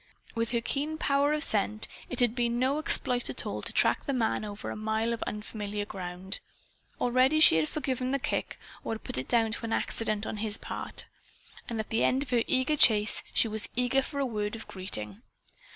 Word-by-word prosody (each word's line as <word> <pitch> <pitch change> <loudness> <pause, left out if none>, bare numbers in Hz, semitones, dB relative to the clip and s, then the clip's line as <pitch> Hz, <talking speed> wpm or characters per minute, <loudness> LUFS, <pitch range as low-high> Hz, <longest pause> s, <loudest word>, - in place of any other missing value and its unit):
With 230 0 -1
her 235 -1 0
keen 295 +6 -2
power 285 -1 +2
of 305 0 +2
scent, 215 -2 0 0.2
it 255 - +4
had 240 -2 +3
been 240 -1 0
no 265 +4 +1
exploit 250 -5 +5
at - - -3
all - - -4
to - - -6
track - - +2
the 280 - 0
man 230 -4 0
over 205 -1 -6
a - - -5
mile 220 +2 -1
of 230 - -5
unfamiliar 210 -1 -5
ground. 185 -1 -5 0.6
Already 255 +5 +3
she 235 - +8
had 155 -1 +1
forgiven 260 -4 -1
the 275 - +1
kick 270 - -3 0.3
or - - -3
had 220 - -11
put - - -3
it 130 - -5
down 225 -2 +2
to 230 +1 -4
accident 215 -1 -1
on 215 - -4
his 210 0 -2
part. - - -3 0.6
And 230 -2 -3
at 220 - -5
the 225 - +1
end 265 +2 +2
of 260 - -11
her 240 -2 +3
eager 260 +4 +2
chase, 210 -5 +4
she - - +3
was 215 -1 -2
eager 250 +2 +2
for 280 +2 -6
a 275 - +1
word 210 -3 -3
of 225 - -9
greeting. 110 - -5
230 Hz, 210 wpm, -29 LUFS, 210-260 Hz, 0.6 s, she